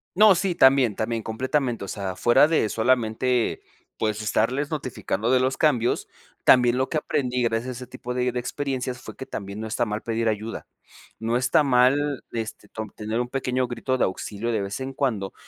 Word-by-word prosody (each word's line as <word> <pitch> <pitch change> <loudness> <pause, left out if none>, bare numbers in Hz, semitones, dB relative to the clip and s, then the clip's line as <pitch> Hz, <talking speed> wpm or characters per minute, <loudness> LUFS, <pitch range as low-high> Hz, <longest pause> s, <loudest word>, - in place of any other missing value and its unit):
No, 210 -1 +7
sí. 185 0 0
También, 130 - +5
también, 115 0 -2
completamente, 125 -1 -1
o - - -10
sea, 95 -3 -4
fuera 125 +5 +5
de 155 -9 +2
solamente, 120 +1 +1 0.4
pues, 110 -1 -1
estarles 125 +7 0
notificando 120 - -2
de 130 - +5
los 130 +1 +1
cambios, 125 -7 +1 0.3
también 125 -1 +5
lo 130 +1 0
que 155 - -1
aprendí, 125 -4 -1
gracias 115 +1 0
a - - -2
ese 125 +1 -8
tipo 125 - -6
de 125 0 0
de 125 - -1
experiencias, 130 -1 -3
fue - - -10
que 130 - -7
también 100 +1 -6
no 110 - -4
está 120 +2 0
mal 105 0 -3
pedir 115 0 -1
ayuda, 110 +1 -3 0.5
no 115 +2 0
está 125 +4 +3
mal, 140 +2 +2
este, 115 -1 -5
tom 110 -1 -6
tener 110 +4 -3
un 125 - -4
pequeño 130 -1 -1
grito 125 +2 -2
de - - +1
auxilio 105 +4 -3
de 110 -3 0
vez 100 +4 -4
en 130 +1 -4
cuando, 115 -8 -2
125 Hz, 195 wpm, -24 LUFS, 110-130 Hz, 0.5 s, No